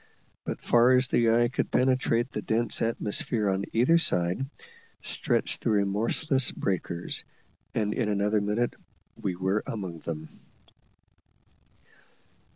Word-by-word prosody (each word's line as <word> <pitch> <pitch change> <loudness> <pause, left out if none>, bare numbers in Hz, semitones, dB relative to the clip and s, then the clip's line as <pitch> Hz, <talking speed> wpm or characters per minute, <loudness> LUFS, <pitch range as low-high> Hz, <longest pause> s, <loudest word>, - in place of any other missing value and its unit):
But - - -5
far 120 +2 +5
as 130 0 +3
the 115 -1 +3
eye 120 +1 +4
could 125 - -2
penetrate 125 -1 +1
the - - -4
dense 115 0 -1
atmosphere 110 -1 0
on 95 +1 -1
either 130 +9 +4
side, 90 - +1 0.6
stretched - - +1
the - - -1
remorseless 110 +7 +2
breakers, 85 -2 -2 0.5
and 105 -1 0
in 115 -4 -1
another 105 +1 +1
minute 105 +4 0 0.4
we 90 - -3
were 95 +3 0
among 95 -6 -5
them. 80 -1 -6
110 Hz, 120 wpm, -27 LUFS, 100-120 Hz, 0.6 s, far